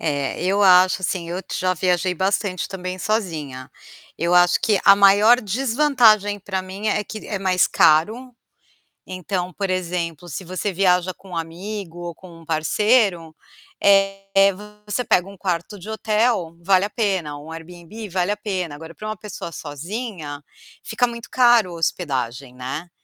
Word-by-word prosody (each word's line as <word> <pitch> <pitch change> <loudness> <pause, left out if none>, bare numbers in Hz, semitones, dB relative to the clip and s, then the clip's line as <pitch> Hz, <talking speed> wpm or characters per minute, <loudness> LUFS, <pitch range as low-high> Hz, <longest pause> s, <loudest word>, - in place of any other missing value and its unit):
É, 145 0 -2
eu 195 +3 +1
acho, 185 0 +5
assim, 170 -2 -2
eu 180 +2 -3
já 185 0 0
viajei 180 +1 0
bastante 190 0 -1
também 185 -1 -6
sozinha. 160 - -3 0.5
Eu 170 +1 +1
acho 175 0 +5
que 210 -3 +2
a 200 - +8
maior 205 +5 +6
desvantagem 225 -2 +3
pra 190 -1 -3
mim 190 +3 -5
é 210 0 0
que 215 0 -8
é 205 - -3
mais 185 -2 +2
caro, 215 +11 +2 0.7
então, 185 0 -4
por 195 +1 -3
exemplo, 175 -2 -3
se 165 +5 -6
você 185 +3 -3
viaja 180 -1 +2
com 195 - -17
um 175 - -6
amigo 175 +2 -6
ou 175 -1 -6
com 170 -2 -14
um - - -16
parceiro, 175 +2 +1 0.5
eh, 195 0 +3 0.3
você 210 +4 -2
pega 180 -4 +2
um 200 - -12
quarto 185 +1 -3
de 190 +3 -11
hotel, 215 -5 0
vale 190 +2 +3
a 205 - -3
pena, 190 -11 -1
um 155 +3 -10
Airbnb 175 +6 -9
vale 185 +2 0
a - - -3
pena, 190 -7 -4
agora 160 +2 -11
pra 215 - -8
uma 215 - -4
pessoa 200 -4 -8
sozinha, 155 - -6 0.4
fica 245 - 0
muito 235 -1 -8
caro 240 -6 +4
a - - -8
hospedagem, 135 -6 -2
né. 130 +7 -6
185 Hz, 160 wpm, -21 LUFS, 170-205 Hz, 0.7 s, a